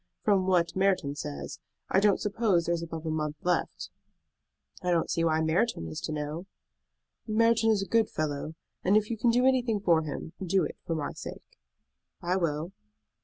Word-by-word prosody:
From 190 -2 +3
what 175 -2 +2
Merton 190 -7 +2
says, 70 - -6 0.3
I 190 - +3
don't 205 0 +3
suppose 205 -5 +1
there 170 - +1
is 170 - -1
above 165 -1 -6
a 160 - -1
month 150 -1 -2
left." 180 -1 -1 0.9
"I 180 - -2
don't 170 -2 +1
see 165 - +1
why 160 -1 +2
Merton 160 - +1
is 80 - -6
to - - -4
know." 150 +4 -4 0.8
"Merton 230 +1 +3
is 210 -3 +3
a - - -7
good 225 -1 +3
fellow; 155 0 -3 0.3
and 195 +3 +5
if 215 +1 0
you 230 - -2
can 240 - +3
do 245 +2 +3
anything 250 -5 +2
for 170 -5 +3
him, 155 +1 -6
do 190 0 +2
it - - -4
for 165 - 0
my 150 -2 -2
sake." - - -10 0.6
"I 175 +1 0
will." 165 -1 -1
175 Hz, 185 wpm, -29 LUFS, 155-205 Hz, 0.9 s, and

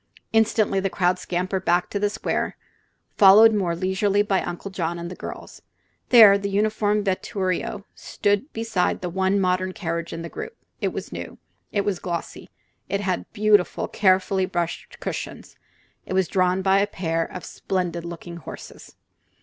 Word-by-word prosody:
Instantly 220 -3 +3
the 195 0 0
crowd 180 -1 +1
scampered 185 +2 -2
back 175 0 +2
to 205 - -1
the 205 0 +1
square, - - -2 0.6
followed 215 +3 +8
more 185 -5 0
leisurely 195 +3 +1
by 195 -2 +1
Uncle 185 +3 -6
John 170 -2 -2
and 170 +1 -6
the - - -7
girls. - - -9 0.5
There 215 -5 +8
the 200 0 -3
uniformed 210 0 +1
vetturio 190 0 -2
stood 205 +8 -1
beside 225 -5 -1
the 180 -1 -4
one 190 +2 +1
modern 185 0 0
carriage 170 -2 -4
in 165 0 -6
the - - -5
group. 445 - -8 0.2
It - - +1
was - - -5
new; - - -7 0.3
it 205 - +1
was 195 -3 -1
glossy; 170 -2 -5 0.4
it 200 - -1
had 185 -3 -2
beautiful, 210 -3 +2
carefully 190 -1 +2
brushed 175 -2 -4
cushions; - - -6 0.5
it - - -4
was 190 -2 +2
drawn 185 0 +1
by 195 +1 +4
a 200 - +2
pair 165 -4 -1
of 180 - -8
splendid 175 -3 -3
looking 170 0 -8
horses. 170 - -11
190 Hz, 160 wpm, -23 LUFS, 180-205 Hz, 0.6 s, followed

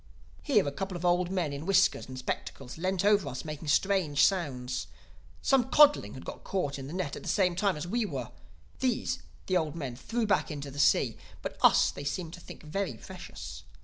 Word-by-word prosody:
"Here 215 - +3
a - - 0
couple 190 +4 -4
of 175 - -5
old 175 0 +3
men 180 -6 -1
in 140 +3 -6
whiskers 190 -1 +3
and 130 0 -8
spectacles 130 0 -5
leant 185 +3 -1
over 205 -7 +4
us, 130 +2 -6
making 155 0 -6
strange 155 -2 +3
sounds. 130 -10 -1 0.6
Some 260 -2 +3
codling 290 - +5
had 130 - -9
got - - -7
caught 145 -8 -2
in 135 - -6
the 150 - -7
net 180 -6 -2
the - - -7
same 180 -4 +2
time 195 -2 +1
as 150 - -4
we 230 +7 0
were. - - -5 0.5
These 240 - 0 0.3
the 185 - +2
old 160 -2 -1
men 135 -7 -4
threw 230 - -2
back 205 - +2
into 145 -2 -5
the 145 - -8
sea; 140 - +3 0.3
but - - -4
us - - +6
they 140 - -8
seemed 160 +4 -3
to 180 - -8
think 170 - -11
very 190 +6 -2
precious. 80 - -9
175 Hz, 205 wpm, -30 LUFS, 140-195 Hz, 0.6 s, us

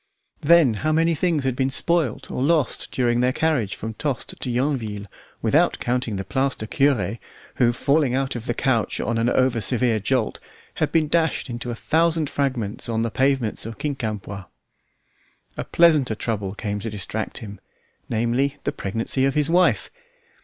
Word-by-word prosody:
Then 160 -5 +5
how 155 - +1
many 165 +2 +3
things 160 -2 0
had 130 -2 0
been 130 +1 +1
spoilt 160 -2 +1
or - - -3
lost 150 -2 +1
during 120 -2 +1
their 125 +1 +3
carriage 130 -9 0
from 110 +1 -5
Tostes 135 +1 -3
to 130 - -4
Yonville, 120 -5 -1 0.4
without - - +3
counting 120 -3 -1
the 95 - -3
plaster 130 +1 -1
cure, 115 -5 +1 0.4
who 120 -2 +4
falling 140 +1 +1
out 135 -1 -1
of 120 +1 -6
the 120 - -1
coach 120 -5 0
at 115 0 -1
an 115 +1 +2
over 130 -2 +2
severe 120 -1 +2
jolt, 115 +2 0 0.4
had - - 0
been 160 -2 +2
dashed 160 -4 0
into 120 +1 -5
a 120 - -3
thousand 160 +2 +1
fragments 125 -6 -2
on 115 0 0
the 115 - -2
pavements 135 -4 0
of 115 - -7
Quincampoix! 105 -8 -4 1.1
A - - -3
pleasanter 155 -9 +4
trouble 105 -4 -3
came 105 -1 -3
to 115 +3 -4
distract 105 +1 -3
him, 105 -4 -8 0.5
namely, 120 +5 0
the - - 0
pregnancy 115 +2 -1
of 135 - 0
his 150 +1 +2
wife. 180 +1 +3
125 Hz, 165 wpm, -23 LUFS, 115-145 Hz, 1.1 s, Then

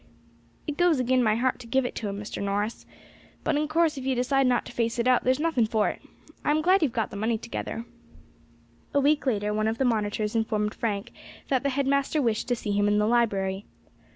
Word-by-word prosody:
"It 300 -2 -4
goes 350 -5 +3
agin 255 0 +2
my 215 -3 +3
heart 255 +3 0
to 245 - -11
give 265 +2 +1
it - - -3
to 210 - -3
him, 200 0 -5
Mr. 210 - -6
Norris; 205 +3 -2 0.6
but 315 - +1
in 300 +1 0
course 315 -2 +1
if - - -7
you 265 0 0
decide 260 +2 +2
not 245 -1 +1
to - - -9
face 230 -1 -1
it 235 +1 0
out 255 -1 +4
there's 255 +2 +2
nothing 300 -8 +1
for 215 -1 +1
it. - - -7 0.4
I - - 0
am 305 +1 +2
glad 370 +3 +4
you 310 - +4
have 235 - -10
got 225 -2 -1
the - - -8
money 220 +2 0
together." 235 0 -5 1.1
A - - +5
week 285 0 +2
later 210 -3 0
one 215 +1 0
of 225 +1 -1
the 265 - +1
monitors 215 -2 0
informed 215 -1 0
Frank 205 -3 -3 0.4
that 265 -2 +2
the 280 - 0
head 275 +1 0
master 280 +2 +1
wished 230 -5 0
to 245 - +1
see 215 -3 -4
him 205 0 +2
in 205 0 +3
the 210 - +2
library. 200 -4 0
235 Hz, 235 wpm, -26 LUFS, 215-270 Hz, 1.1 s, A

